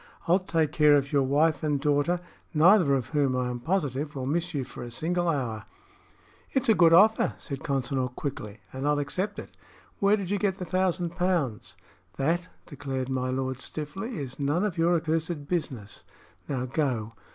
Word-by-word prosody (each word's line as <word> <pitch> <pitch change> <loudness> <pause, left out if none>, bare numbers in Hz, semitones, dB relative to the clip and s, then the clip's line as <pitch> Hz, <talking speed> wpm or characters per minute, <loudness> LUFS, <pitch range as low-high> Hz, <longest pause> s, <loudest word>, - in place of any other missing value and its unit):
I'll 175 +3 +5
take 165 -5 0
care 150 -1 +5
of 140 -1 +1
your 145 -2 +3
wife 145 +3 +2
and 150 -2 0
daughter, 145 +4 +1 0.4
neither 165 -2 +6
of 130 -3 -2
whom, 140 -4 +1
I 125 -1 0
am 120 - -4
positive, 145 -1 -1
will 130 -2 -3
miss 170 +5 -1
you 140 -4 -2
for 130 - -9
a 120 - -6
single 175 +8 0
hour." 120 -9 -2 0.9
"It's 265 - +1
a 225 - +6
good 170 -4 +5
offer," 210 +6 +5
said 140 -4 -6
Consinor, 135 -1 -1
quickly, 105 -7 -5
"and 135 +2 -3
I'll 150 0 +3
accept 185 +8 -2
it. - - -9 0.4
Where 200 +1 +4
did 195 -2 -4
you 205 - +1
get 195 -2 0
the 180 - -5
thousand 185 -2 0
pounds?" 170 - -1 0.4
"That," 170 +6 0 0.2
declared 135 -3 -4
my 130 -1 -1
lord, 130 0 -2
stiffly, 190 - -5
"is 135 -2 -6
none 145 +6 +1
of 205 -5 -1
your 170 +1 +3
accursed 160 -2 -1
business! 135 - -4 0.5
Now 130 -3 -1
go. 125 -5 -1
150 Hz, 180 wpm, -27 LUFS, 130-175 Hz, 0.9 s, neither